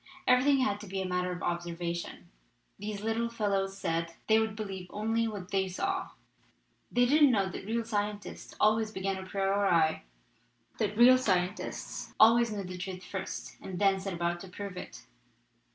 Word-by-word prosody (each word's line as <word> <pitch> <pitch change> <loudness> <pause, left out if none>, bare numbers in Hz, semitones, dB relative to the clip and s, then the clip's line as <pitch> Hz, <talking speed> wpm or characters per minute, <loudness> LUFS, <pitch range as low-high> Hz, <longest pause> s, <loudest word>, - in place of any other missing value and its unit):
Every 250 0 +5
thing 280 -1 +4
had 205 -6 +1
to 210 - -9
be 190 +1 -3
a 190 - -2
matter 180 0 -1
of 180 - -5
observation, 170 0 -3 0.5
these 205 0 -4
little 225 +1 0
fellows 195 -4 -1
said; 165 -2 -2
they 220 0 +5
would 220 -1 -1
believe 195 -4 -5
only 225 +3 0
what 200 -4 -6
they 190 -1 +1
saw. 380 - -2 0.8
They 245 0 +4
didn't 290 +3 +6
know 200 -6 +2
that 195 - -7
real 230 +1 -1
scientists 205 -2 -4
al 215 +1 +5
ways 220 -1 -1
begin 195 -2 -2
a - - -6
priori, 195 -4 +2 0.8
that 210 -2 -1
real 255 +2 +8
scientists 185 -4 -2
always 230 +1 +6
know 205 -2 -3
the 180 0 -7
truth 185 0 -5
first - - -6
and 185 - -6
then 195 0 +3
set 195 0 -4
about 170 0 -1
to 190 - -9
prove 195 +1 -7
it. 180 - -9
200 Hz, 175 wpm, -30 LUFS, 180-220 Hz, 0.8 s, real